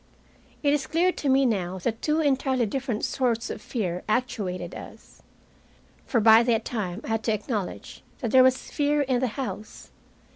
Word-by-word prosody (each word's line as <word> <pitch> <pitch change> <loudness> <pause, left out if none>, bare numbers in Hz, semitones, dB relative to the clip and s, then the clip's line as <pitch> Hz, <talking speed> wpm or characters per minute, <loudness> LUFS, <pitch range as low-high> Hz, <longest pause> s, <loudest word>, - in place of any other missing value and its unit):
It 285 0 +3
is 275 -3 -1
clear 350 +3 +2
to 290 - -3
me 270 +1 +4
now 190 -6 -1
that 225 +5 -3
two 310 +1 +1
entirely 265 -4 +1
different 245 0 -2
sorts 240 -3 -1
of - - -7
fear 180 -7 -3
actuated 215 -6 -2
us. - - -12 0.9
For 240 - +2
by 220 +1 +7
that 230 -2 +1
time 205 -4 -3
I - - -7
had 225 0 -1
to 220 - +2
acknowledge 210 -2 -4 0.2
that 235 -6 -3
there 260 - +7
was 255 0 +2
fear 290 0 +1
in 260 -3 +1
the 260 - +1
house. 230 -5 -6
240 Hz, 175 wpm, -26 LUFS, 215-270 Hz, 0.9 s, by